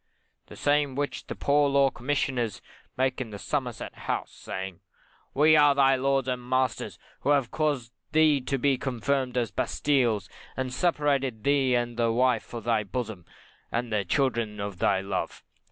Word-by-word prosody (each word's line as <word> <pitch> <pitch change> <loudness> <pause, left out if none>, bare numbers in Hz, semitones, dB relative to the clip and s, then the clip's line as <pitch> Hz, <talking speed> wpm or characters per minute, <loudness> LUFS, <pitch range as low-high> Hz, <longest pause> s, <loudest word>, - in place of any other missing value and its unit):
The - - -11
same 145 -2 +1
which 145 +1 -3
the - - -5
Poor 145 0 +3
Law 140 -1 +4
Commissioners 125 -4 -1 0.4
make 130 0 0
in 110 -5 -6
Somerset 125 0 -3
House, - - -3
saying, 95 -2 -6 0.6
We 155 +3 +6
are 145 -2 +6
thy 135 -1 +5
lords 135 0 +1
and 125 -1 -1
masters, 130 -1 -1 0.2
who - - -2
have 140 -4 +2
caused 140 -7 -1 0.2
thee 155 -3 +4
to 135 +2 -1
be 135 0 +1
confined 130 0 -1
as 120 -3 +1
in - - -40
bastiles, 120 -9 +1 0.3
and 130 -1 -2
separated 140 -7 0
thee 135 -3 +3
and 120 -1 -1
the 115 -1 +2
wife 125 -1 +1
of 115 - -5
thy 115 -2 +1
bosom, 105 -4 -5 0.5
and 115 -1 -2
the 105 -2 +1
children 115 0 0
of 100 -2 -5
thy 95 -1 +2
love. 95 -1 -4
130 Hz, 165 wpm, -27 LUFS, 115-140 Hz, 0.6 s, We